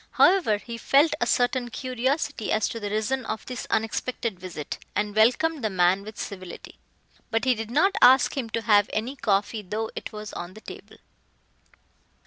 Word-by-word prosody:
However, 360 Hz, -, +4 dB
he 230 Hz, +2 st, -8 dB
felt 285 Hz, +7 st, +4 dB
a 240 Hz, -, +2 dB
certain 245 Hz, 0 st, +1 dB
curiosity 255 Hz, +1 st, -2 dB
as 215 Hz, -1 st, +2 dB
to 230 Hz, -, -5 dB
the 205 Hz, -2 st, -4 dB
reason 220 Hz, +5 st, -1 dB
of 220 Hz, -, -4 dB
this 250 Hz, -1 st, -6 dB
unexpected 225 Hz, -2 st, -2 dB
visit 175 Hz, -5 st, -6 dB, 0.2 s
and 205 Hz, 0 st, -1 dB
welcomed 255 Hz, +7 st, +3 dB
the 220 Hz, -, +1 dB
man 185 Hz, 0 st, +2 dB
with 215 Hz, +1 st, -10 dB
civility. 185 Hz, -3 st, -8 dB, 0.5 s
But 225 Hz, +1 st, 0 dB
he 255 Hz, -, +4 dB
did 225 Hz, -1 st, -5 dB
not 375 Hz, +11 st, +2 dB
ask 255 Hz, +1 st, +6 dB
him 255 Hz, -5 st, -3 dB
to 230 Hz, 0 st, -3 dB
have 205 Hz, -2 st, +4 dB
any 235 Hz, +6 st, -2 dB
coffee 210 Hz, -2 st, 0 dB
though 215 Hz, +3 st, -4 dB
it -, -, -6 dB
was 210 Hz, 0 st, -8 dB
on 175 Hz, +2 st, -7 dB
the 215 Hz, -, -12 dB
table. -, -, -11 dB
225 Hz, 175 wpm, -25 LUFS, 210-255 Hz, 0.5 s, ask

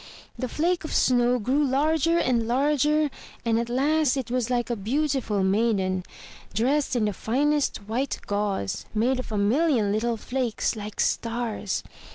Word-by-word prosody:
The 255 Hz, -, -4 dB
flake 340 Hz, +6 st, 0 dB
of 315 Hz, -, -4 dB
snow 245 Hz, 0 st, +3 dB
grew 260 Hz, +6 st, +1 dB
larger 310 Hz, +4 st, +2 dB
and 235 Hz, -7 st, +1 dB
larger 295 Hz, +3 st, +2 dB, 0.3 s
and 230 Hz, 0 st, +2 dB
at 235 Hz, 0 st, -3 dB
last 285 Hz, +2 st, +2 dB
it 255 Hz, -3 st, -4 dB
was 250 Hz, -1 st, 0 dB
like 245 Hz, -1 st, 0 dB
a -, -, 0 dB
beautiful 245 Hz, -2 st, 0 dB
maiden, 190 Hz, -2 st, +1 dB, 0.5 s
dressed 265 Hz, +5 st, +1 dB
in 230 Hz, -3 st, +2 dB
the 210 Hz, -, 0 dB
finest 285 Hz, +8 st, 0 dB
white 250 Hz, +6 st, -2 dB
gauze, 200 Hz, -, -2 dB
made 250 Hz, +4 st, +2 dB
of 255 Hz, -, -6 dB
a 210 Hz, -, -1 dB
million 225 Hz, +1 st, +2 dB
little 230 Hz, +2 st, 0 dB
flakes, 250 Hz, -1 st, -1 dB
like 210 Hz, -1 st, -7 dB
stars. 230 Hz, -4 st, -1 dB
245 Hz, 155 wpm, -25 LUFS, 220-280 Hz, 0.5 s, snow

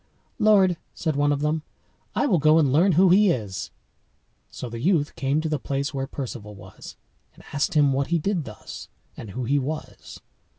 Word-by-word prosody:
"Lord," 195 Hz, -5 st, +4 dB, 0.2 s
said 160 Hz, -3 st, -2 dB
one 145 Hz, +1 st, +2 dB
of 145 Hz, 0 st, -1 dB
them, 155 Hz, +1 st, 0 dB, 0.5 s
"I -, -, +2 dB
will 190 Hz, -, +2 dB
go 155 Hz, +2 st, +5 dB
and 145 Hz, -5 st, +3 dB
learn 175 Hz, +6 st, +4 dB
who 185 Hz, +4 st, +5 dB
he 205 Hz, +2 st, +5 dB
is." 105 Hz, -, -3 dB, 0.8 s
So 125 Hz, -, -7 dB
the 115 Hz, 0 st, -7 dB
youth 155 Hz, 0 st, +1 dB
came 140 Hz, +3 st, 0 dB
to 160 Hz, -, -2 dB
the 150 Hz, -2 st, -1 dB
place 140 Hz, +2 st, -3 dB
where 135 Hz, -1 st, -3 dB
Perceval 115 Hz, -7 st, -7 dB
was, -, -, -12 dB, 0.4 s
and -, -, -17 dB
asked 145 Hz, +5 st, -1 dB
him 145 Hz, -2 st, +4 dB
what 135 Hz, +1 st, 0 dB
he 170 Hz, -, +1 dB
did 170 Hz, -1 st, -1 dB
thus, 105 Hz, -, -10 dB, 0.3 s
and 110 Hz, -, -9 dB
who 125 Hz, +6 st, -5 dB
he 140 Hz, +4 st, +1 dB
was. 150 Hz, +4 st, -6 dB
145 Hz, 195 wpm, -24 LUFS, 135-170 Hz, 0.8 s, go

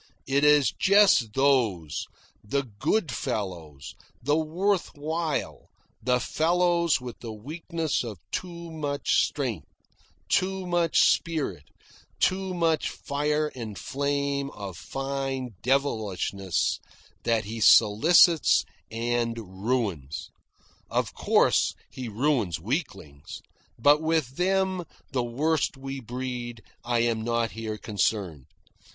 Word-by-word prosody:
It 140 Hz, +1 st, +1 dB
is 150 Hz, -5 st, +5 dB
just 195 Hz, -, +4 dB
those, 115 Hz, -, +1 dB, 0.4 s
the 140 Hz, +7 st, -1 dB
good 130 Hz, -, -1 dB
fellows, 80 Hz, -, -4 dB, 0.3 s
the 145 Hz, +4 st, +1 dB
worth 175 Hz, +5 st, 0 dB
while, 155 Hz, +1 st, -3 dB, 0.3 s
the 125 Hz, +2 st, +2 dB
fellows 170 Hz, +2 st, +2 dB
with 125 Hz, -2 st, -8 dB
the 115 Hz, -, -7 dB
weakness 160 Hz, +7 st, -3 dB
of 110 Hz, -5 st, -6 dB
too 170 Hz, -2 st, -5 dB
much 145 Hz, -3 st, +1 dB
strength, 120 Hz, -, -4 dB, 0.6 s
too 190 Hz, -, 0 dB
much 175 Hz, -2 st, +2 dB
spirit, 140 Hz, -, -2 dB, 0.5 s
too 190 Hz, 0 st, +1 dB
much 165 Hz, -2 st, +1 dB
fire 150 Hz, +1 st, -1 dB
and 110 Hz, -6 st, -7 dB
flame 140 Hz, +4 st, -1 dB
of 100 Hz, -3 st, -7 dB
fine 135 Hz, +2 st, -4 dB
devilishness, 105 Hz, -, 0 dB, 0.4 s
that 115 Hz, -3 st, +1 dB
he 115 Hz, +2 st, -5 dB
solicits 150 Hz, -, +6 dB, 0.2 s
and 115 Hz, 0 st, -1 dB, 0.3 s
ruins. 100 Hz, -, -2 dB, 0.6 s
Of -, -, -1 dB
course, -, -, +3 dB, 0.2 s
he 125 Hz, -3 st, -6 dB
ruins 110 Hz, -, 0 dB
weaklings; 95 Hz, -, -5 dB, 0.3 s
but 145 Hz, +6 st, +5 dB
with 160 Hz, -5 st, 0 dB
them, 190 Hz, 0 st, +1 dB, 0.3 s
the 130 Hz, -3 st, 0 dB
worst 145 Hz, +5 st, 0 dB
we 135 Hz, 0 st, -6 dB
breed, 120 Hz, -2 st, -5 dB, 0.2 s
I 120 Hz, -1 st, +1 dB
am 115 Hz, -1 st, +1 dB
not 115 Hz, 0 st, 0 dB
here 110 Hz, -1 st, -5 dB
concerned. 100 Hz, -, -2 dB
130 Hz, 110 wpm, -27 LUFS, 110-155 Hz, 0.6 s, solicits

